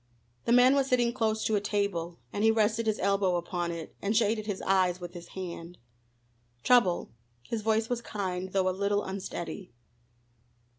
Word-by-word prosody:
The -, -, +1 dB
man 250 Hz, +2 st, +7 dB
was 275 Hz, -1 st, +2 dB
sitting 240 Hz, -2 st, +2 dB
close 220 Hz, -3 st, 0 dB
to 220 Hz, -, +1 dB
a 205 Hz, -, +1 dB
table, 195 Hz, -5 st, -2 dB, 0.2 s
and 205 Hz, -, -1 dB
he 220 Hz, -, +6 dB
rested 225 Hz, +1 st, +2 dB
his 215 Hz, -, +1 dB
elbow 195 Hz, -2 st, +1 dB
upon 175 Hz, 0 st, -2 dB
it, 165 Hz, -1 st, -7 dB
and 210 Hz, +2 st, +1 dB
shaded 215 Hz, -1 st, +1 dB
his 205 Hz, -3 st, -2 dB
eyes 185 Hz, -2 st, +2 dB
with 175 Hz, -1 st, -8 dB
his 175 Hz, -1 st, -9 dB
hand. 175 Hz, -1 st, -6 dB, 0.9 s
"Trouble?" 205 Hz, -9 st, +3 dB, 0.3 s
his 220 Hz, -, -3 dB
voice 220 Hz, +1 st, +1 dB
was 245 Hz, -1 st, -2 dB
kind, 190 Hz, -4 st, -4 dB
though 190 Hz, -1 st, +1 dB
a -, -, +3 dB
little 200 Hz, +2 st, 0 dB
unsteady. 190 Hz, -1 st, -6 dB
200 Hz, 170 wpm, -29 LUFS, 180-220 Hz, 0.9 s, man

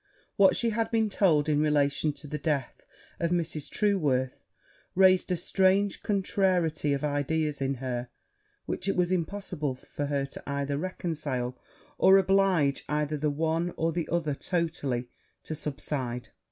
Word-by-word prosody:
What 195 Hz, -1 st, +5 dB
she 230 Hz, -1 st, +1 dB
had 225 Hz, +1 st, 0 dB
been 220 Hz, -2 st, +1 dB
told 160 Hz, -7 st, +3 dB
in 150 Hz, -1 st, +2 dB
relation 150 Hz, 0 st, +2 dB
to 145 Hz, +1 st, -9 dB
the 150 Hz, +1 st, -4 dB
death 145 Hz, -4 st, -2 dB, 0.3 s
of 170 Hz, -, +1 dB
Mrs. 165 Hz, -4 st, -1 dB
Trueworth, 145 Hz, -12 st, +1 dB, 0.6 s
raised 185 Hz, 0 st, +5 dB
a 180 Hz, -, +1 dB
strange 190 Hz, +3 st, +2 dB
contrariety 185 Hz, -6 st, +1 dB
of 140 Hz, -, -2 dB
ideas 150 Hz, 0 st, -1 dB
in 135 Hz, 0 st, 0 dB
her, 125 Hz, -1 st, -4 dB, 0.6 s
which 185 Hz, -, -3 dB
it -, -, +1 dB
was 180 Hz, 0 st, +1 dB
impossible 175 Hz, -5 st, -2 dB
for 145 Hz, +2 st, -5 dB
her 140 Hz, -1 st, -1 dB, 0.2 s
either 140 Hz, 0 st, -2 dB
to 140 Hz, -, -1 dB
reconcile, 150 Hz, -8 st, -3 dB, 0.4 s
or 190 Hz, +1 st, +7 dB
oblige 190 Hz, -7 st, +3 dB
either 150 Hz, 0 st, 0 dB
the 150 Hz, +1 st, 0 dB
one 160 Hz, +4 st, -1 dB
or 165 Hz, +1 st, +1 dB
the 165 Hz, 0 st, -3 dB
other 165 Hz, -3 st, 0 dB
totally 145 Hz, -7 st, -2 dB, 0.4 s
to -, -, -5 dB
subside. 135 Hz, -5 st, -4 dB
155 Hz, 150 wpm, -28 LUFS, 140-185 Hz, 0.6 s, or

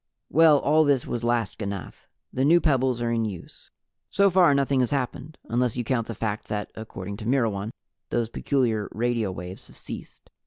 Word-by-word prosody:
Well, 160 Hz, -2 st, +6 dB
all 155 Hz, +3 st, +3 dB
this 140 Hz, -4 st, +2 dB
was 120 Hz, -1 st, -3 dB
last 120 Hz, -4 st, 0 dB
ganath. 100 Hz, -3 st, -6 dB, 0.3 s
The 130 Hz, -, 0 dB
new 165 Hz, +5 st, +6 dB
pebbles 130 Hz, -6 st, +1 dB
are 115 Hz, -, 0 dB
in 115 Hz, -1 st, +1 dB
use. 100 Hz, -6 st, -7 dB, 0.4 s
So 200 Hz, -1 st, +3 dB
far 175 Hz, -5 st, +5 dB
nothing 140 Hz, -1 st, +2 dB
has 125 Hz, -, +2 dB
happened 140 Hz, +2 st, -3 dB
unless 120 Hz, 0 st, 0 dB
you 120 Hz, -, -1 dB
count 115 Hz, -1 st, -1 dB
the 115 Hz, -, -5 dB
fact 105 Hz, 0 st, -3 dB
that, 105 Hz, -1 st, -4 dB
according 100 Hz, -3 st, -7 dB
to 110 Hz, -, -8 dB
Myrwan, 115 Hz, -5 st, 0 dB, 0.4 s
those 120 Hz, -1 st, 0 dB
peculiar 115 Hz, -3 st, 0 dB
radio 115 Hz, -3 st, 0 dB
waves 90 Hz, +1 st, -8 dB
have -, -, -16 dB
ceased. -, -, -10 dB
120 Hz, 185 wpm, -25 LUFS, 110-140 Hz, 0.4 s, Well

